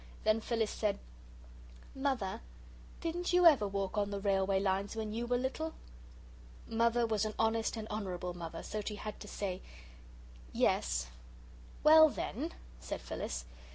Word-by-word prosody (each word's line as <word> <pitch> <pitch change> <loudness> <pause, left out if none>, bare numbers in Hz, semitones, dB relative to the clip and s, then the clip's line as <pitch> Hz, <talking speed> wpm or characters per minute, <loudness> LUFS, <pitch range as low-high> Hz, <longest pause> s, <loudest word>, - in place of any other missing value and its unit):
Then 215 +1 +3
Phyllis 225 -2 0
said, 210 -2 0 1.0
"Mother, 265 -8 -1 0.6
didn't 350 +2 -2
YOU 360 0 +5
ever 275 -11 +7
walk 195 +1 -1
on 205 0 0
the 200 0 -3
railway 195 -1 +2
lines 195 +2 0
when 215 -1 -3
you 235 +2 -2
were 245 0 +2
little?" 270 +6 -2 0.9
Mother 235 +1 +2
was 220 -2 +1
an 215 -1 -2
honest 225 +1 +1
and 220 -1 -5
honourable 185 -4 -3
Mother, 165 -1 -6
so 215 - -3
she 210 +1 -4
had 210 +1 -6
to 210 - -9
say, 190 -3 -3 0.9
"Yes." 60 0 +2 0.8
"Well, 315 +1 +9
then," 295 +4 -3 0.3
said - - -5
Phyllis. 60 0 -4
215 Hz, 145 wpm, -34 LUFS, 195-240 Hz, 1.0 s, Well